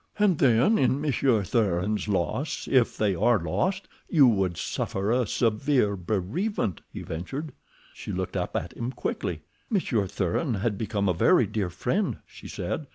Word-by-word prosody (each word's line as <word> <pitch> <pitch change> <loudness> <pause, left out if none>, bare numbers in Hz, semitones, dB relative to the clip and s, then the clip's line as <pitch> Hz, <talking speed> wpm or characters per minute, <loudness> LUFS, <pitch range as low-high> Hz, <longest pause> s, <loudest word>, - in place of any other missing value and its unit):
"And 205 -6 +3
then 130 - +4
in 130 +1 +2
Monsieur 135 -6 +2
Thuran's 105 0 0
loss, 105 - -1
if 130 -3 +2
they 105 -3 +2
are 115 +6 +3
lost, 185 - -1 0.2
you 150 -6 +6
would 95 -7 +2
suffer 100 +3 -2
a 125 -1 +2
severe 115 -1 +1
bereavement," 100 - -2
he - - -7
ventured. 135 - -5 0.4
She - - -7
looked - - -3
up - - -2
at 85 - -3
him 120 +2 -4
quickly. - - -3 0.3
"Monsieur 130 - 0
Thuran 100 - -1
had 105 +2 -1
become 100 -1 -1
a 90 - +3
very 85 - +4
dear 100 -5 -2
friend," 185 - -1
she - - -12
said. - - -4
110 Hz, 160 wpm, -26 LUFS, 95-140 Hz, 0.4 s, you